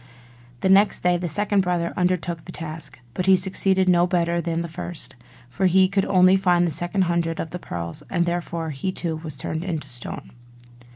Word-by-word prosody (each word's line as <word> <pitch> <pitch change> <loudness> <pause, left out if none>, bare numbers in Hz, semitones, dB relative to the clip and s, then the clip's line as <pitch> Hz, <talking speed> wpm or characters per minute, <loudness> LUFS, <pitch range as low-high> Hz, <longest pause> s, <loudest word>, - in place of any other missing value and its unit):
The 190 - +1
next 195 +1 +4
day 180 0 +3
the 175 0 -3
second 205 +4 +2
brother 175 -2 -1
undertook 175 -2 -1
the 180 - -8
task; 160 -5 -8
but 185 - -3
he 190 - +7
succeeded 190 0 +2
no 175 -1 +4
better 170 -1 0
than 170 0 -2
the - - -5
first; 165 -1 -4 0.3
for 185 +10 0
he 185 +1 +5
could 195 0 0
only 185 0 +5
find 175 -2 +3
the 170 - -1
second 175 +5 +1
hundred 170 -2 -1
of 160 - -4
the 180 - -5
pearls; 85 - -5
and 170 - +1
therefore 170 -2 -3
he 145 +7 -3
too 165 -3 -3
was 155 -3 -7
turned 160 +4 -4
into 170 -5 -4
stone. 120 -1 -7
175 Hz, 195 wpm, -23 LUFS, 165-185 Hz, 0.3 s, he